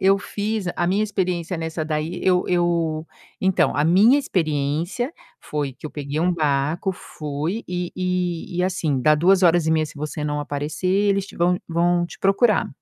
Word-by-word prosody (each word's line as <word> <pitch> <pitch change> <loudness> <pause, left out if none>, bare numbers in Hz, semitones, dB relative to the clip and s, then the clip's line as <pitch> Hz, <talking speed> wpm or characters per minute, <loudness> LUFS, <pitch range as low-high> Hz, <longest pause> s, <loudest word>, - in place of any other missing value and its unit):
eu 195 +1 +4
fiz 210 0 -3
a 175 - 0
minha 195 +4 +2
experiência 180 -4 -2
nessa 160 0 -3
daí, 155 +2 -2
eu 180 -1 +3
eu 170 -3 0 0.3
então, 190 -1 +2
a 145 - +2
minha 205 - +5
experiência 165 - -1 0.3
foi 145 -2 -3
que 130 - -21
eu 155 - -4
peguei 145 0 -4
um 180 +3 +2
barco, 155 +3 0
fui 155 +4 -4
e 180 -1 -3
e 180 -1 -2
e 180 - +1
assim 160 -7 0
dá 155 +2 +5
2 185 +5 +4
horas 170 -2 +4
e - - +2
meia, 160 -1 +2
se 155 - -10
você 150 +1 -4
não 150 0 -1
aparecer, 145 +4 -4
eles 200 +1 +2
te - - -13
vão 175 +1 +2
vão 175 +1 +2
te - - -12
procurar. 200 +3 +3
175 Hz, 185 wpm, -22 LUFS, 155-185 Hz, 0.3 s, minha